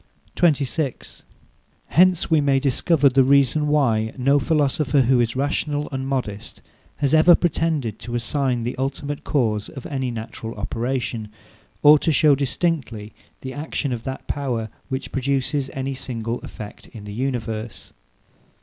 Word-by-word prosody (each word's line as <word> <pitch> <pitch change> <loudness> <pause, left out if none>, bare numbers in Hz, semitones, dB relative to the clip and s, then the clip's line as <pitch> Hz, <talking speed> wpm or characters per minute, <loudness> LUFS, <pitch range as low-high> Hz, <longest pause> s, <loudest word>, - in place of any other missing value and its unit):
26. 145 -4 0 0.7
Hence 180 -1 +3
we 160 -2 +5
may 140 -1 +3
discover 145 +2 +2
the 135 0 +4
reason 140 +2 +3
why 115 -7 +2
no 140 +3 +3
philosopher, 145 -1 +2
who 130 0 +3
is 120 0 0
rational 145 +2 -1
and 135 -1 -3
modest, 115 -6 -4 0.4
has 140 -1 0
ever 160 +2 +7
pretended 155 - -1
to 120 +2 -6
assign 125 0 0
the 120 - -3
ultimate 140 +2 -3
cause 110 -7 0
of 135 - -10
any 130 -3 -2
natural 115 -1 -6
operation, 120 -2 -3 0.5
or 150 0 +8
to 160 - +1
show 150 -1 +5
distinctly 135 -6 -2 0.3
the 130 0 -6
action 145 -2 -3
of 115 -2 -5
that 130 0 -6
power, 120 -6 -2 0.2
which 130 0 -4
produces 135 +1 -1
any 135 0 -3
single 120 -2 -4
effect 105 -1 -10
in 110 - -11
the 105 0 -8
universe. 115 -3 -4
135 Hz, 140 wpm, -22 LUFS, 120-145 Hz, 0.7 s, or